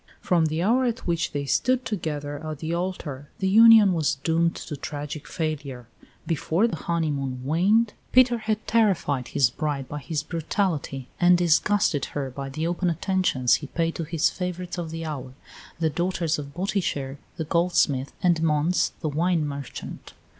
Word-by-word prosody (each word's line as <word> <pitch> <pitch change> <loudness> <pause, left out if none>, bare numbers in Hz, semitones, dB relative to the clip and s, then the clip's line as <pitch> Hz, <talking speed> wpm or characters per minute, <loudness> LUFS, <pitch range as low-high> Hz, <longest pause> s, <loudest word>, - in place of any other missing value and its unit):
From 170 -3 +2
the 155 +2 -1
hour 245 +6 +3
at 240 0 -2
which 170 -2 0
they 140 -1 -3
stood 255 - +1
together 150 -7 -4
at 155 -1 -5
the 160 +3 -4
altar 170 -6 -4
the 190 - -1
union 220 -1 +8
was 155 -3 +1
doomed 165 +4 +1
to 150 - -6
tragic 145 +1 -6
failure; 145 -6 -4 0.4
before 165 +4 +1
the 195 - -3
honeymoon 140 -7 -2
waned 200 +9 +3 0.2
Peter 245 -2 +5
had 215 -1 -2
terrified 190 - +1
his 135 -5 +2
bride 145 -2 -3
by 150 - -5
his 145 +2 -3
brutality 160 -6 -2
and 175 0 +6
disgusted 175 -2 +2
her 135 -2 -2
by 135 +1 -6
the 155 +4 -3
open 175 +1 0
attentions 170 -7 +1
he 145 - -6
paid 165 +2 -1
to 165 - -4
his 165 +1 +1
favourites 180 -1 -4
of 170 -2 -4
the 165 0 -5
hour, 130 -4 -6 0.4
the 160 -2 +1
daughters 175 -2 -1
of 140 -1 -8
Botticher, 170 -8 -2 0.2
the 160 - -2
goldsmith, 150 -5 +1
and 175 -3 +3
Mons, 160 +2 +1
the 155 - -1
wine 165 +2 +1
merchant. 140 -2 -7
165 Hz, 165 wpm, -25 LUFS, 145-180 Hz, 0.4 s, union